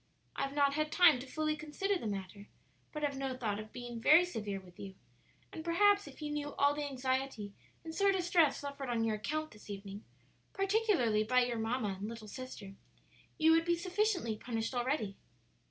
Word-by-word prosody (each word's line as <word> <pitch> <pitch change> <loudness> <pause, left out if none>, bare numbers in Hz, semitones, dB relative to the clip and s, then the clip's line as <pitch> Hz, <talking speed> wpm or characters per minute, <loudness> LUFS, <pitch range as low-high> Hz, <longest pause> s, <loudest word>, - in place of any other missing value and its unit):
I - - -3
have 275 +1 -2
not 280 -1 +3
had 305 +1 -1
time 335 -7 +6
to 265 - -8
fully 310 +2 -1
consider 310 +7 -2
the 340 - -3
matter, 200 0 -5 0.4
but 300 -1 -5
have 285 -1 0
no 265 -1 -3
thought 210 -5 -2
of 215 0 -8
being 240 -2 -7
very 310 +8 +7
severe 210 - -4
with 180 -2 -17
you; 195 -1 -8 0.6
and 315 - -6
perhaps 405 +4 +4
if - - -10
you 295 - -3
knew 290 -1 -3
all 285 +1 +4
the 295 0 -3
anxiety 260 -5 -2 0.3
and 320 - -7
sore 395 +3 +3
distress 350 -6 +3
suffered 280 -2 -6
on 235 -1 +1
your 220 -1 0
account 310 +9 -3
this 210 -1 -15
evening 200 0 -7 0.5
particularly 390 - +2
by 250 +3 +3
your 240 -2 -2
mamma 220 -3 -1
and 205 +2 -4
little 225 -2 -8
sister 220 -4 -8 0.6
you 320 +1 +5
would 330 0 +5
be 345 +1 +2
sufficiently 360 - 0
punished 225 +1 -3
already." 240 -5 -1
270 Hz, 190 wpm, -33 LUFS, 220-315 Hz, 0.6 s, very